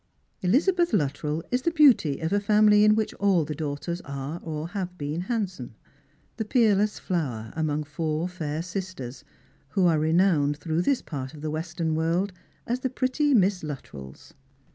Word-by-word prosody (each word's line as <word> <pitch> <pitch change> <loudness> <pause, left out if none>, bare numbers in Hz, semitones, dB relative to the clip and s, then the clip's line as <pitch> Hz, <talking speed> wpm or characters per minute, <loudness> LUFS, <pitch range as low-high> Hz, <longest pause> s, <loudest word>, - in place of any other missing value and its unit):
Elizabeth 340 - +2
Luttrell 150 +2 0
is 250 +1 +1
the 335 - +1
beauty 270 - +4
of 160 +4 -1
a 205 - +3
family 210 0 +5
in 215 0 +6
which 220 -1 -1
all 195 -5 +3
the 150 - -4
daughters 155 +4 -4
are 140 +4 -5
or 155 0 -4
have 180 -2 -5
been 150 +3 -3
handsome 185 - -3 0.3
— - - -38
the - - -1
peerless 210 -3 +2
flower 130 - -3
among 155 -1 -1
four 155 +2 -2
fair 160 -3 -4
sisters, 180 -9 -6 0.5
who 185 +6 +2
are 165 -3 +4
renowned 155 -2 +2
through 160 +1 -1
this 265 +8 +1
part 135 -1 -6
of 150 - -11
the 155 0 -3
western 160 +1 -2
world 170 +5 0 0.3
as 245 +2 -1
the 260 - -1
pretty 260 +3 +1
Miss 195 -3 +3
Luttrells. 70 - -9
170 Hz, 165 wpm, -26 LUFS, 150-205 Hz, 0.5 s, in